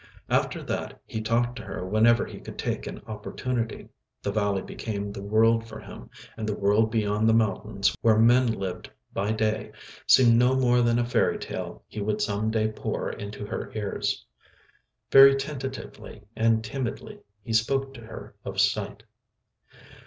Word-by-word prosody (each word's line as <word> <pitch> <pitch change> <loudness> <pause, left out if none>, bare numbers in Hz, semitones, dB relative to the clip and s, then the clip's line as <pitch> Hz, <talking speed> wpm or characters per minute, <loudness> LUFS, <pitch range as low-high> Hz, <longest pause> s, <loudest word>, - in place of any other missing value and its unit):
After - - +1
that - - -4
he 110 - -4
talked 120 +2 +1
to - - -6
her 90 -4 -6
whenever 110 +4 +4
he - - -9
could - - -10
take - - -3
an - - -8
opportunity. 115 +2 -4 0.3
The 100 - -1
valley 100 -2 0
became 100 -2 -5
the 100 - -7
world 115 +3 +3
for 110 - -8
him, - - -11 0.3
and 110 -1 -4
the 105 - -1
world 105 +2 +3
beyond 110 0 +1
the 110 - +5
mountains 100 -2 +1
where 110 -2 +4
men 120 +3 +5
lived 95 -4 -5 0.2
by 100 +2 -1
day 110 0 -1 0.4
seemed 120 -3 +7
no 125 +2 +4
more 125 -2 +3
than 120 0 +3
a 120 - +1
fairy 120 - +1
tale - - -6
he 105 - -6
would 105 +1 -1
some 105 +1 0
day 110 -1 +1
pour 110 - -3
into 105 0 -7
her - - -5
ears. 105 -2 -2 0.9
Very 135 0 +9
tentatively 135 -6 -6
and 115 0 +2
timidly 120 +2 -5 0.2
he 115 - -4
spoke 135 +5 +1
to 120 - -11
her 110 - -10
of - - -5
sight. - - 0
110 Hz, 165 wpm, -26 LUFS, 105-120 Hz, 0.9 s, Very